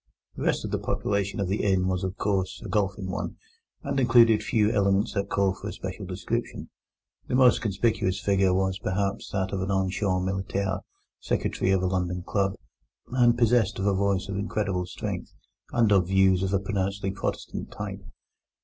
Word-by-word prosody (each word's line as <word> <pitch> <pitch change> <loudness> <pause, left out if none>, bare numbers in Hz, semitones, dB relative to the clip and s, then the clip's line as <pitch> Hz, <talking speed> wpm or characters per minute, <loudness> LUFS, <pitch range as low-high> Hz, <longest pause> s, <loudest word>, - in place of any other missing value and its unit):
The - - -7
rest - - 0
of - - -5
the - - 0
population 100 -1 -1
of 100 - 0
the 100 +3 0
inn 95 -2 +2
was, 90 -1 -1
of 95 0 -3
course, 95 -2 -1
a - - -4
golfing 100 -2 -1
one, 105 - -4 0.5
and - - -1
included 115 -3 +5
few 105 -1 +2
elements 100 +1 +2
that 100 -1 -2
call 100 -1 +2
for 95 - -8
a - - -3
special - - -6
description. - - -4 0.6
The - - -1
most 125 -2 +5
conspicuous 105 -2 0
figure 95 -1 +2
was, 95 +1 0
perhaps, 100 0 -2
that 95 -1 -2
of 95 - -1
an 95 - -2
ancien 95 -1 0
militaire, 95 0 -1 0.4
secretary - - -1
of 95 -1 +2
a - - +2
London 90 -1 -1
club, 95 0 0 0.6
and 120 -2 +4
possessed 115 -3 +3
of 95 - -2
a 100 - +3
voice 100 0 0
of 100 -1 -3
incredible 100 -3 -1
strength, - - -5 0.4
and 115 -3 +3
of 95 -3 +4
views 95 -1 +4
of 95 0 -1
a 100 - +2
pronouncedly 100 0 -2
Protestant 95 - -4
type. - - -6
100 Hz, 180 wpm, -26 LUFS, 95-105 Hz, 0.6 s, included